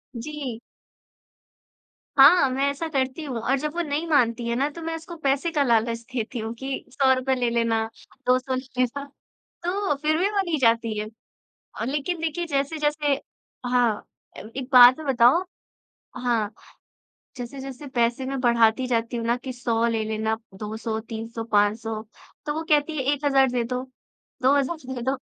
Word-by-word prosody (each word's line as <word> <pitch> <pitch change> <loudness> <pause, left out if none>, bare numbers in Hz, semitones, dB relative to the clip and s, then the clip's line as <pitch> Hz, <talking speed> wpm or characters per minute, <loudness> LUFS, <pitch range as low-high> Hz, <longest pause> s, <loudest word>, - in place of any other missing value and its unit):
जी। 260 -2 -5 1.6
हाँ, 275 0 +8
मैं 265 +2 -1
ऐसा 280 +4 -3
करती 270 +1 -1
हूँ 255 -5 -4
और 265 +4 +1
जब 300 +1 -3
वो 345 - 0
नहीं 300 +4 -2
मानती 235 -5 +2
हैं 235 - 0
ना 280 +4 +1
तो 335 - -7
मैं 325 0 -3
उसको 330 +1 -8
पैसे 280 +5 +1
का 290 -2 +3
लालच 230 -1 +2
देती 235 0 -3
हूँ 225 +1 -4
कि 270 0 -4
₹100 265 -1 +2
ले 245 -2 0
लेना, 230 -1 +1 0.4
200 255 +1 +2
ले 255 - -2 0.2
लेना 255 +3 0 0.6
तो, 375 -3 0
फिर 310 +2 0
भी 385 +4 +2
वो 405 -2 +1
नहीं 340 -4 -1
जाती 230 -2 +2
है। 210 - -2 0.8
लेकिन 300 +5 -2
देखिए 330 +2 -2
जैसे-जैसे 295 0 0 0.5
हाँ, 245 -4 +1 0.3
ए - - -7 0.2
एक 260 0 -7
बात 250 0 +9
में 305 - -7
बताओ 260 +7 +5 0.7
हाँ, 230 -4 0 0.9
जैसे-जैसे 265 +3 -7
पैसे 235 +2 +1
में 270 0 -3
बढाती 235 +1 +3
जाती 230 0 -1
हूँ 230 - -3
ना 240 +1 +2
कि 260 +1 -7
100 235 -2 0
ले 225 -1 0
लेना, 220 0 -1 0.2
200 220 +2 -4
300 225 0 -6
500 215 +1 +1 0.4
तो 295 - -1
वो 320 +2 -3
कहती 300 +1 +2
है 270 - -1
1,000 275 -2 +3
दे 245 -2 0
दो, 250 +2 -3 0.6
2,000 280 +4 +2 0.2
दे 245 - -5
दो। 265 +3 0
255 Hz, 165 wpm, -24 LUFS, 235-290 Hz, 1.6 s, बात